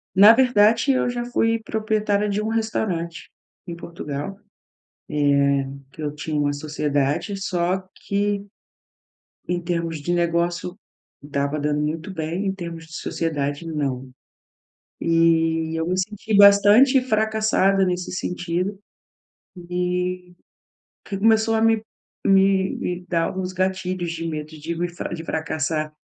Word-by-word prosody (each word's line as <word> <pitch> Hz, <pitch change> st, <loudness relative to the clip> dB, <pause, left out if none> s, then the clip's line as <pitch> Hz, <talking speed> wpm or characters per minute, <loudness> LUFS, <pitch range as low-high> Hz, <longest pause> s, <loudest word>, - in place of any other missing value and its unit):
Na 205 Hz, +4 st, +9 dB
verdade, 230 Hz, 0 st, +4 dB
eu 255 Hz, -2 st, +1 dB
já 240 Hz, 0 st, -3 dB
fui 230 Hz, -2 st, +1 dB
proprietária 215 Hz, -2 st, 0 dB
de 205 Hz, +1 st, 0 dB
um 215 Hz, -, -2 dB
restaurante 205 Hz, -7 st, -2 dB, 0.4 s
em 170 Hz, -, -5 dB
Portugal, 170 Hz, +2 st, -6 dB, 1.3 s
eh, 140 Hz, -, -9 dB, 0.2 s
que 155 Hz, -, -9 dB
eu 145 Hz, 0 st, -3 dB
tinha 150 Hz, 0 st, -2 dB
uma 145 Hz, 0 st, +1 dB
sociedade, 150 Hz, +4 st, -1 dB
só 185 Hz, 0 st, -1 dB, 0.2 s
que 200 Hz, 0 st, 0 dB, 1.0 s
em 175 Hz, 0 st, 0 dB
termos 170 Hz, -2 st, -2 dB
de 175 Hz, +5 st, -2 dB
negócio 170 Hz, +1 st, 0 dB, 0.5 s
estava 140 Hz, +1 st, -2 dB
dando 150 Hz, 0 st, 0 dB
muito 160 Hz, +5 st, -3 dB
bem, 170 Hz, +4 st, -3 dB
em 190 Hz, -, +1 dB
termos 170 Hz, -3 st, -7 dB
de 165 Hz, -, -13 dB
sociedade, 145 Hz, -2 st, -2 dB
não. 135 Hz, -5 st, -3 dB, 0.9 s
E 165 Hz, -1 st, +2 dB
eu 160 Hz, +1 st, -1 dB
me 185 Hz, -, 0 dB
senti 210 Hz, +2 st, -2 dB
bastante 205 Hz, +7 st, +7 dB
fracassada 215 Hz, -4 st, +2 dB
nesse 180 Hz, 0 st, -2 dB
sentido 180 Hz, +2 st, -2 dB, 0.9 s
e 180 Hz, 0 st, -2 dB, 0.7 s
que 195 Hz, -, -4 dB
começou 220 Hz, +1 st, +3 dB
a 220 Hz, -, +1 dB
me 225 Hz, -1 st, +3 dB, 0.4 s
me 195 Hz, 0 st, +3 dB
me 180 Hz, 0 st, -4 dB
dar 165 Hz, -2 st, +1 dB
alguns 185 Hz, 0 st, -3 dB
gatilhos 185 Hz, -1 st, -2 dB
de 165 Hz, 0 st, -4 dB
medo 155 Hz, -1 st, -4 dB
de 165 Hz, +3 st, -4 dB
me 175 Hz, +1 st, -1 dB
fra 175 Hz, -, -6 dB
de 165 Hz, -1 st, -5 dB
fracassar 155 Hz, -1 st, -2 dB
180 Hz, 130 wpm, -23 LUFS, 160-200 Hz, 1.3 s, Na